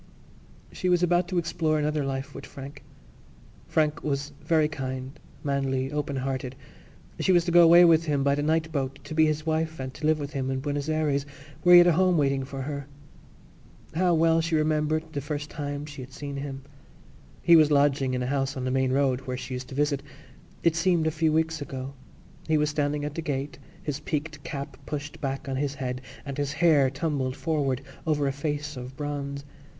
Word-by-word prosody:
She 185 - -2
was 180 0 +3
about 175 0 +3
to 180 0 -2
explore 165 -2 +1
another 150 0 0
life 135 +1 -4
with - - -9
Frank. 140 +1 -10 0.8
Frank 155 0 +1
was 145 0 -2
very 160 -2 +3
kind, 130 -1 -5 0.2
manly, 135 -1 -1
open 150 -1 -2
hearted. 130 -1 -3 0.6
She - - +2
was 175 -2 +4
to 175 - 0
go 175 0 +8
away 170 +1 +8
with 165 -1 +5
him 145 -3 +1
by 140 0 +3
the 145 - 0
night 160 +1 +1
boat 135 -2 -2
to - - -7
be 155 0 +4
his 155 0 -1
wife 160 -1 -1
and 130 0 -5
to 150 +2 -3
live 155 0 +4
with 145 +1 -5
him 135 -2 -2
in 130 0 -1
Buenos 145 +1 -2
Ayres 150 -3 0 0.3
where 175 +1 +8
he - - +12
had 175 - +9
a 175 - +6
home 180 +1 +3
waiting 135 -2 +2
for 135 0 -5
her. 140 0 -5 1.1
How 175 +1 +3
well 165 0 +4
she 165 0 0
remembered 155 0 +1
the 140 - -2
first 150 +1 -4
time 145 -1 -4
she 145 -2 -9
had 130 +1 -10
seen 140 -1 -6
him; 135 -1 -5 0.8
he 170 - +7
was 155 -2 +6
lodging 140 -3 +3
in 125 - -1
a - - -1
house 135 +1 -1
on 130 - -3
the 130 - 0
main 130 0 +1
road 135 -1 +2
where 130 0 -2
she 130 0 -6
used 125 0 -5
to - - -8
visit. 145 -1 +1 0.6
It 170 -1 +3
seemed 165 -1 +2
a 160 - +2
few 155 0 +1
weeks 160 0 0
ago. 135 -1 -5 0.5
He 160 -1 +3
was 150 0 +1
standing 145 0 -1
at 150 - -4
the 165 - -3
gate, 140 -3 -3 0.2
his 145 -1 -3
peaked 150 -1 -4
cap 140 -3 -6
pushed 145 0 -5
back 135 +1 -3
on 135 -1 -2
his 140 0 -1
head 125 -1 -4 0.2
and 140 0 -5
his 140 -1 -1
hair 155 -5 +4
tumbled 135 -2 -2
forward 145 -5 -1 0.2
over 150 -2 +2
a 135 - +1
face 145 +1 -3
of 125 +1 -8
bronze. 140 -1 -4
145 Hz, 205 wpm, -27 LUFS, 135-155 Hz, 1.1 s, he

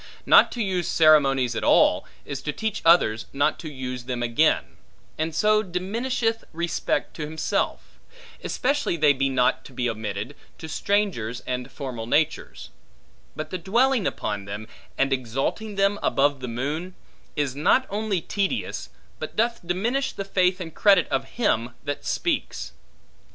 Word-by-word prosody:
Not - - +7
to 235 - -1
use 185 -3 -1
ceremonies 135 -6 +4
at - - -2
all, - - +4 0.2
is 135 -1 -5
to 150 - -2
teach 220 +6 -3
others 140 -10 +4
not 140 +1 +1
to 155 -3 -7
use 130 -2 -5
them 125 -1 -3
again; 115 - +1 0.4
and 155 0 -2
so 215 +2 +4
diminisheth 225 +5 -2
respect 170 +1 -1
to - - -5
himself; 160 +1 -2 0.4
especially 280 -8 0
they 150 -2 +5
be 135 0 0
not 130 0 +2
to 135 - -12
be 125 0 -1
omitted, 110 +3 -4 0.2
to 160 - -8
strangers 160 - -1
and 125 +1 -4
formal 125 -4 -6
natures; 155 +5 -1 0.6
but 155 0 -6
the 185 - -3
dwelling 235 +4 +2
upon 105 -2 -3
them, 105 +2 -6 0.3
and 135 0 +2
exalting 135 - -2
them 200 +1 +2
above 145 0 +2
the 130 - -5
moon, 150 +10 -3 0.4
is 140 -3 -1
not 155 - +3
only 205 -3 -1
tedious, 200 +8 -2 0.3
but - - -6
doth 235 +1 +1
diminish 225 +11 -1
the 195 - -5
faith 185 -1 +2
and 165 -3 -6
credit 195 -4 +4
of - - 0
him 120 - +1
that 145 0 -4
speaks. - - -2
155 Hz, 150 wpm, -25 LUFS, 130-200 Hz, 0.6 s, Not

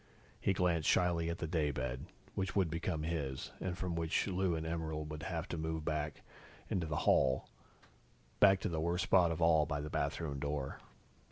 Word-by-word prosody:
He 100 - +2
glanced 90 -4 +2
shyly 85 -2 +3
at 85 - -2
the 85 - -3
daybed, 70 -4 -1 0.3
which 95 -2 -2
would 95 -5 +2
become 85 -1 -2
his, 75 -5 -3
and 90 -1 -2
from 90 -2 -2
which 85 -1 +1
Lou 95 -2 +1
and 80 0 -3
Emerald 80 -2 -3
would 75 0 -5
have 85 +1 -3
to 85 - -3
move 80 -1 -2
back 75 -1 -2 0.5
into 85 -4 0
the 75 - -2
hall, 65 -1 +4 0.9
back 95 -1 +7
to - - 0
the 80 -2 -1
worst 85 +2 +1
spot 90 -3 +5
of 80 0 -1
all 80 -2 +5
by 75 -2 -1
the 75 +1 -5
bathroom 70 -1 -1
door. 70 -1 -3
80 Hz, 185 wpm, -35 LUFS, 75-85 Hz, 0.9 s, back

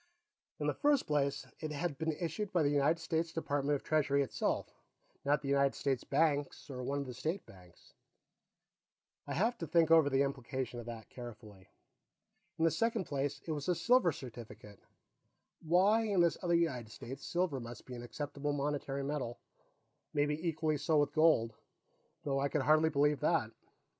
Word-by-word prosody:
In - - -3
the - - +1
first 290 -2 +2
place, 140 -2 0
it 155 -1 -4
had 150 -1 -3
been 160 0 0
issued 175 +5 -3
by 175 -3 +2
the 145 - +2
United 145 +3 +3
States 165 0 -1
Department 145 -3 0
of 140 - -5
Treasury 140 -2 +2
itself, 135 - -1 0.6
not 145 +1 +2
the - - -4
United 140 0 +3
States 135 -3 -1
Bank 145 -1 +2 0.2
or 125 -1 -5
one 140 +3 -2
of 140 - -2
the 125 - -6
State 160 +10 -3
Banks. 90 -2 -18 1.3
I'd - - -3
have 230 +6 +1
to 165 - -4
think 165 0 +3
over 160 -3 +7
the 135 0 +3
implications 130 -2 -3
of 120 - -8
that 115 -2 -8
carefully. 110 -6 -10 0.9
In 160 - +2
the 165 - +4
second 225 +5 0
place, 140 0 -2
it 165 - -3
was 150 +1 -3
a 180 - +3
silver 240 -3 +4
certificate; 115 -6 -10 0.8
why, 190 +7 +4
in 200 -3 +1
this 170 -1 +2
other 175 -1 +2
United 130 -10 0
States, 135 +5 -8
silver 170 -6 -1
must 120 0 -9
be 130 - -9
an 120 - -6
acceptable 145 +4 -4
monetary 140 -1 -2
metal; 135 -4 -3 0.8
maybe 150 +3 +1
equally 155 -1 0
so 155 +2 +1
with 145 - -1
gold, 155 -8 +4 0.7
though 135 -3 0
I 140 +1 +1
could 150 -2 0
hardly 155 +3 +4
believe 145 -1 +2
that. 150 -7 +1
145 Hz, 175 wpm, -34 LUFS, 135-165 Hz, 1.3 s, over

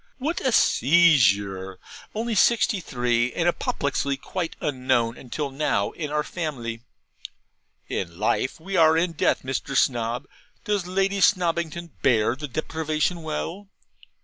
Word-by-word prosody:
What 300 +6 -2
a 260 - +1
seizure! 100 - +3 0.4
only 230 +2 -2
sixty 220 0 +3
three, 120 -5 0
and 170 - 0
apoplexy 140 -4 -1
quite 170 +4 -4
unknown 125 -4 0
until 140 +3 -5
now 135 -8 0
in 155 -3 -5
our 150 0 0
family! 125 -11 -5 1.1
In 85 -3 -4
life 110 - 0
we 190 +4 -5
are 160 -2 +5
in 170 +1 +1
death, 165 - +1
Mr. 130 0 -2
Snob. 120 -1 +1 0.4
Does 205 -4 -1
Lady 195 +2 0
Snobbington 170 -3 +1
bear 115 -2 +3
the 150 +2 -6
deprivation 155 +4 -2
well?' 165 +5 -5
150 Hz, 125 wpm, -24 LUFS, 125-175 Hz, 1.1 s, are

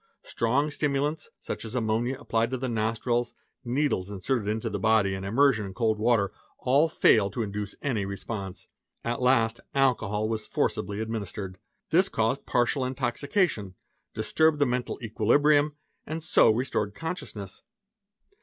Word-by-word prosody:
Strong 135 +6 0
stimulants, 145 +1 -1
such - - -5
as 115 +2 -7
ammonia 120 +2 0
applied 115 -4 0
to 130 - -2
the 130 +1 -3
nostrils, 115 +1 -1 0.2
~ - - -54
needles 125 -6 0
inserted 105 +3 -2
into 110 +1 -1
the 105 - -3
body, 110 -2 +3
and 95 0 -4
immersion 115 +2 +3
in 95 -1 -7
cold 110 -3 +1
water, 110 -3 +2 0.3
all 140 +6 +3
failed 100 -8 +4
to 115 - -1
induce 105 0 -4
any 120 -8 0
response. 100 0 -6 0.4
At 120 +2 -2
last 120 -3 +3 0.2
alcohol 110 -6 +2
was 110 -1 -3
forcibly 100 +1 -1
administered. 100 -4 -5 0.3
'This 185 +5 +4
caused 115 +5 -1
partial 125 +2 +1
intoxication, 130 - -1 0.4
disturbed 160 -1 +2
the 145 - +3
mental 125 -1 -2
equilibrium, 145 +7 +3 0.3
and 160 +1 -4
so 115 - +5
restored 110 -3 0
consciousness. 115 - -6
115 Hz, 145 wpm, -27 LUFS, 105-135 Hz, 0.4 s, so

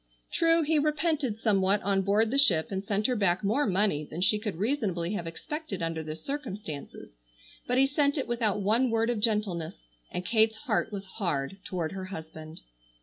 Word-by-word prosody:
True, 330 0 +3
he 310 0 +2
repented 300 -5 0
somewhat 200 -2 +3
on 195 -1 +2
board 210 +3 +2
the 275 - +2
ship 175 - +3
and 190 0 -2
sent 205 +1 -1
her 250 - +2
back 195 -3 +1
more 225 +8 +2
money 195 -6 +1
than 155 +2 -7
she 210 +3 +3
could 210 -4 -3
reasonably 195 - -1
have 170 -5 -3
expected 260 - -5
under 165 -1 -2
the 155 0 -5
circumstances, 190 - -6 0.5
but 250 - +1
he 270 - +6
sent 285 +1 +1
it 275 - -1
without 225 -4 0
one 230 +6 +3
word 225 +1 +2
of 235 - -2
gentleness, 190 - -1 0.2
and 180 - -4
Kate's 220 +1 +3
heart 225 -2 0
was 200 -1 -5
hard 175 -4 -3
toward 175 -5 -3
her 190 -1 -5
husband. 160 -3 -9
205 Hz, 185 wpm, -29 LUFS, 180-245 Hz, 0.5 s, he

